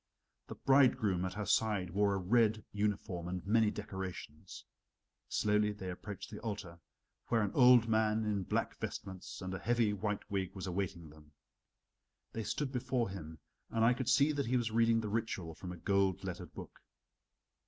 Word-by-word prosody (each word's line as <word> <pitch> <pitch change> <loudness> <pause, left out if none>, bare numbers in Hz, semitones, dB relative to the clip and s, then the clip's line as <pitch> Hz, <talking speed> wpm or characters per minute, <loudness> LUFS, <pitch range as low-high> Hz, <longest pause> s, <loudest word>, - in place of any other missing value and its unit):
The - - -7
bridegroom 115 -9 +3
at 95 - -4
her 105 0 -3
side 100 -6 +1
wore 100 +1 +2
a - - 0
red 110 +3 +2
uniform 100 -4 -2
and 90 0 -4
many 110 +1 +4
decorations. 95 -5 -7 0.6
Slowly 105 0 +2
they 95 -3 -6
approached 100 +3 -8
the 105 - -7
altar, 95 -6 -6 0.5
where 115 -2 +2
an 100 - -1
old 125 -3 +7
man 110 0 +2
in 105 -2 0
black - - -1
vestments 95 0 -6
and 95 0 -4
a 95 - -4
heavy 115 -3 +2
white 105 0 -3
wig 95 -1 -2
was 95 - -5
awaiting 90 -4 -3
them. 75 -1 -18 1.0
They 115 - -4
stood 130 +6 -2
before 125 -4 -1
him, 80 -4 -8 0.3
and 115 0 +2
I 120 - +5
could 125 -1 -2
see 145 +2 +5
that 140 -3 -1
he 125 +2 +2
was 115 -3 -1
reading 115 0 +3
the 110 - -4
ritual 105 -6 -2
from 90 +3 -8
a 90 - -7
gold 95 +1 +1
lettered 90 -2 -6
book. - - -10
105 Hz, 175 wpm, -34 LUFS, 95-115 Hz, 1.0 s, old